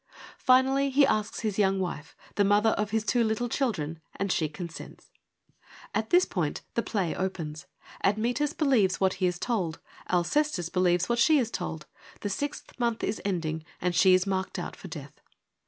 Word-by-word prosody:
Finally 265 +2 +4
he 275 +1 +5
asks 215 -4 -1
his 215 -2 -2
young 195 -1 +3
wife, 165 -5 -4 0.2
the 205 - +2
mother 205 +2 +4
of 210 -1 -1
his 220 0 0
two 240 +1 +2
little 220 +2 0
children, 180 - -2 0.2
and 195 -1 -1
she 155 -3 +1
consents. 170 +1 -9 0.8
At 220 0 -1
this 360 +1 +5
point 165 -6 -2
the 235 - +1
play 195 -8 -1
opens. 165 -4 -4 0.4
Admetus 240 +9 +1
believes 255 - +2
what 190 -1 +3
he 185 - +4
is 180 0 -1
told; 180 -7 -2 0.3
Alcestis 180 - +1
believes 180 -1 +2
what 235 0 0
she 310 +5 +5
is 235 -4 0
told: 160 -6 -4 0.4
the 205 - -2
sixth 285 +5 -5
month 235 -2 0
is - - -2
ending 160 -5 -2 0.2
and 180 0 0
she 185 +2 +6
is 185 +1 +2
marked 190 -1 -2
out - - -5
for - - -10
death. - - -9
200 Hz, 175 wpm, -28 LUFS, 180-235 Hz, 0.8 s, she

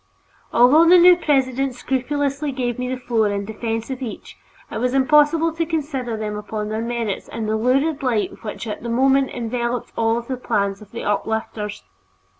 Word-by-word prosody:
Although 300 +8 +6
the 360 - +8
new 355 +1 +8
president 270 -5 0
scrupulously 280 +3 -1
gave 250 -2 -3
me 250 0 -2
the 255 0 -3
floor 230 -4 +1
in 200 0 -2
the 220 - -7
defense 225 +2 -3
of 260 0 -5
each, 235 -5 -7 0.4
it - - -3
was 250 +2 0
impossible 300 +4 +4
to 330 0 -1
consider 285 -8 -3
them 210 -1 -4
upon 210 0 -4
their 220 +1 -2
merits 230 -3 -3
in 225 - -5
the 215 0 0
lurid 275 +7 +1
light 240 -5 -1
which 215 +1 -6
at 215 - -5
the 235 - -5
moment 265 +3 +3
enveloped 240 0 -3
all 225 +1 +1
the 250 +2 -5
plans 200 -5 -1
of 210 - -13
the 230 - -7
"uplifters." 210 - -2
245 Hz, 185 wpm, -21 LUFS, 220-275 Hz, 0.4 s, the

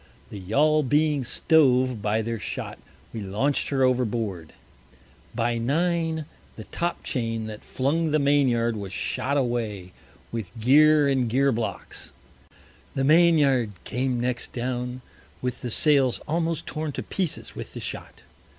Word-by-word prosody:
The 105 - -7
Yaul 150 +11 +2
being 150 0 +1
stove 130 -3 +3
by 110 +1 0
their 115 0 -3
shot, - - -5 0.3
we 110 - -5
launch'd 105 +9 0
her 135 -2 +1
overboard. 115 -9 0 0.8
By 115 0 0
Nine, 160 +4 0 0.3
the 110 - -8
Top 170 +9 -3
chain 115 -3 -2
that 110 -1 -8
flung 155 +5 0
the 155 - +2
Main 140 -1 +3
yard, 115 -1 +1
was 100 -2 -6
shot 130 +2 -1
away, 110 -8 -2 0.4
with 110 -5 -5
Geer 150 +5 +5
and 130 -4 +1
Geer 135 +4 +3
Blocks. 115 -2 -4 0.8
The 135 - 0
Main 165 +3 +5
yard 130 -7 +2
came 125 0 -1
next 125 0 -2
down, 125 0 -3 0.4
with 125 -1 -4
the 125 - -4
Sails 135 0 +4
almost 165 0 -1
torn 155 -1 -4
to - - -4
Pieces 185 -6 -3
with - - -8
the - - -5
Shot. - - -8
130 Hz, 145 wpm, -25 LUFS, 115-150 Hz, 0.8 s, Geer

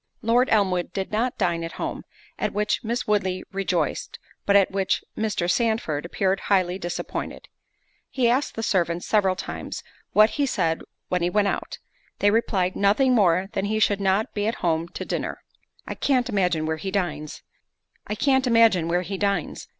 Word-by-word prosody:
Lord 240 +3 +3
Elmwood 185 -5 +1
did 190 -1 -3
not 235 +4 0
dine 170 -1 0
at 165 - -5
home, - - -5 0.3
at - - -1
which 210 +3 0
Miss 235 +2 -2
Woodley 190 -3 0
rejoiced, 180 -5 -2 0.3
but 200 - +4
at 195 -2 +5
which 195 -1 0
Mr. 215 -5 -1
Sandford 180 -8 0
appeared 190 +2 0
highly 185 -2 +2
disappointed. 175 -1 -5 0.6
He 255 -3 +1
asked 255 +5 +1
the 225 - -3
servants 175 -4 0
several 195 -4 +2
times, - - -6 0.3
what 215 +1 +5
he 285 -2 0
said 165 -9 0 0.3
when 180 -1 0
he 175 - +1
went 205 +1 +2
out? - - -4 0.4
They 205 - +3
replied, 195 -5 +1
"Nothing 220 +6 +3
more 190 -4 +3
than 195 -2 -1
that - - -1
he 215 - 0
should 205 -2 +2
not 195 +2 +1
be 205 0 -1
at 230 - 0
home 165 0 +1
to - - -6
dinner." - - -4 0.4
"I - - -4
can't 255 -3 +1
imagine 180 -7 +1
where 160 0 -1
he 190 - -4
dines?" 155 -6 -3
195 Hz, 160 wpm, -24 LUFS, 175-215 Hz, 0.6 s, at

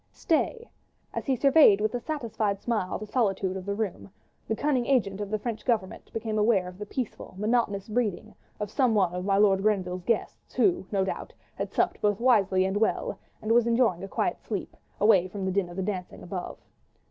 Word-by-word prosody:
Stay! 465 +9 0 0.5
as - - -4
he 265 - +3
surveyed 275 -5 +6
with 215 +2 0
a 245 - -1
satisfied 230 -8 -2
smile 215 -5 -1
the 215 - -7
solitude 195 -5 0
of 190 0 -6
the 200 - -1
room, 205 -2 -4 0.4
the 220 - 0
cunning 265 -2 0
agent 210 -7 +1
of 205 - -4
the 215 - 0
French 225 0 -4
Government 220 -7 -2
became 220 -1 -2
aware 210 -4 +3
of 180 +1 -10
the 210 - -6
peaceful, 235 -5 -5
monotonous 210 -2 0
breathing 220 -2 -2 0.3
of 210 -1 -4
some 250 -4 +2
one 185 -4 +2
of 180 +1 -4
my 195 -1 +2
Lord 195 -2 +4
Grenville's 185 -3 0
guests, 230 +4 -2
who, 355 - +2
no 195 -2 +1
doubt, - - -5 0.2
had - - -4
supped - - 0
both 205 -1 +2
wisely 200 -7 +3
and 190 +1 0
well, 225 - 0 0.2
and 215 - -1
was 235 0 +4
enjoying 230 -7 +2
a - - -4
quiet - - -1
sleep, - - -5 0.2
away 200 -4 +5
from 190 +1 -5
the 190 - 0
din 190 -2 0
of 175 - -9
the 190 - -2
dancing 185 -2 -5
above. 180 0 -5
210 Hz, 205 wpm, -27 LUFS, 190-235 Hz, 0.5 s, surveyed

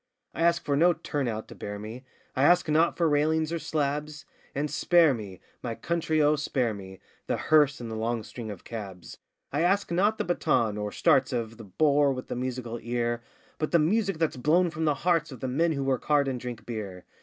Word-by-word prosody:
I - - -5
ask 170 0 +2
for 145 - +1
no 175 +4 +5
'turn 145 -4 -3
out' 110 -1 -4
to - - -9
bear 105 0 -6
me; 110 +5 -8 0.3
I 130 - 0
ask 175 +5 +5
not 160 +2 +2
for 170 - +3
railings 155 +2 +1
or 170 - -1
slabs, 150 0 -2 0.3
And 145 +2 -1
spare 170 -5 +4
me! 100 -6 -8 0.2
my 115 -2 -4
country 165 0 -1
oh, 150 +1 +4
spare 130 -5 0
me! 95 -2 -10 0.3
The - - 0
hearse 145 -3 +3
and 115 -2 -6
the - - -4
long 115 +1 -1
string 115 0 -8
of 100 -4 -8
cabs! 100 -6 -8 0.3
I 145 - +1
ask 190 +2 +2
not 205 +5 +2
the - - -1
baton 150 -11 +1
or 105 0 -3
'starts' 135 +4 +3
of 115 -2 -3
The 115 - -10
bore 145 - +3
with 130 -1 -7
the - - -3
musical 125 -2 -4
ear, 120 0 -1 0.4
But 155 - -1
the 170 - +4
music 195 +4 +1
that's 160 -4 0
blown 165 +7 +3
from 160 -1 -2
the 150 -2 +2
hearts 165 -3 +2
of 130 - -9
The 130 - -3
men 160 +6 +1
who 140 -2 -2
work 135 -2 -1
hard 145 -2 +3
and 130 -2 -2
drink 120 -3 -7
beer. 100 -6 -6
140 Hz, 220 wpm, -27 LUFS, 115-160 Hz, 0.4 s, no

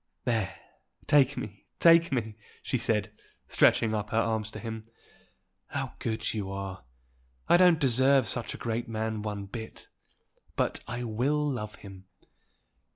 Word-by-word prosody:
"There! 115 -5 0 0.5
take 145 -1 +4
me, 105 -1 -7
take 165 -1 +6
me!" 115 -5 -1 0.3
she 130 - -1
said, 110 -2 0 0.4
stretching 110 -1 +4
up 105 -1 -2
her 110 - -1
arms 110 -2 0
to - - -8
him. 110 -1 -6 0.8
"How - - -4
good 110 -1 -2
you 100 -3 -3
are! 95 -8 -6 0.6
I - - +6
don't 180 -2 +6
deserve 130 +1 +4
such 120 - -2
a - - -8
great 115 +1 -3
man 110 -1 -2
one 105 -2 -4
bit. 110 +3 -9 0.7
But - - 0
I 120 +1 -4
will 135 +7 0
love 105 -6 -4
him. 95 -2 -12
110 Hz, 145 wpm, -29 LUFS, 105-130 Hz, 0.8 s, take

